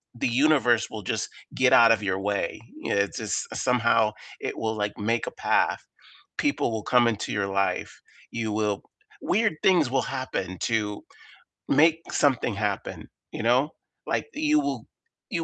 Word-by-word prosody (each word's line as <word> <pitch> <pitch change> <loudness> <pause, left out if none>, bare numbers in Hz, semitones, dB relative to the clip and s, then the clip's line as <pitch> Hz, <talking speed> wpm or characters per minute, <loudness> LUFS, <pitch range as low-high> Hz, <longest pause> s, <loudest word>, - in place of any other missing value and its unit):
the 120 - 0
universe 125 -2 +3
will 105 -2 -7
just - - -2 0.2
get 130 -1 +3
out 115 -1 +7
of 110 -2 +3
your 95 -1 -1
way. 100 0 -2 0.2
It 100 -1 0
just - - -2
somehow 115 -3 +2 0.3
it - - -4
will, 110 0 -2
like, 105 -1 -3
make 115 +3 -1
a - - -3
path. - - +1 0.6
People 290 - +1
will 110 -1 -3
come 120 +1 +4
into 110 -2 -2
your 105 -1 -1
life. 100 0 -1 0.3
You 110 -2 -3
will 105 -1 -1 0.4
weird 210 -4 +1
things 170 -9 +4
will 135 -1 +2
happen 95 -9 -4
to 105 -3 -1 0.6
make 160 +3 +4
something 130 -5 +1
happen, 100 -1 -3 0.2
you - - -4
know? 125 +5 +3 0.4
Like, - - -1
you 305 0 +2
will - - -3 0.4
you 170 -5 -2
115 Hz, 155 wpm, -26 LUFS, 105-135 Hz, 0.6 s, out